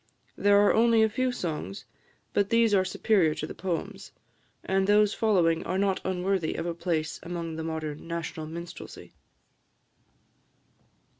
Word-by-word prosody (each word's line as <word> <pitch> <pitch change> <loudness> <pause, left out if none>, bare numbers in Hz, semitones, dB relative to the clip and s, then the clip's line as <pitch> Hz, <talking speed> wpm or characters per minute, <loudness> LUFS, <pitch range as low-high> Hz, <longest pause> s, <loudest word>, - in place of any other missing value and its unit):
There 205 0 +4
are - - +4
only 230 0 +4
a 220 - +3
few 255 +4 0
songs, 155 - -5 0.5
but 200 -1 +1
these 230 -2 +3
are 190 -2 +4
superior 185 -4 +2
to 155 - -4
the - - -7
poems; 195 +2 -4 0.5
and 190 0 +1
those 210 0 +4
following 175 -7 +2
are 185 - -2
not 195 -1 +1
unworthy 185 -2 -1
of - - -3
a 170 - -2
place 165 -3 -2
among 170 -2 -5
the 160 - -4
modern 160 -1 -5
national 165 -2 -4
minstrelsy. 170 +2 -9
185 Hz, 145 wpm, -27 LUFS, 165-205 Hz, 0.5 s, There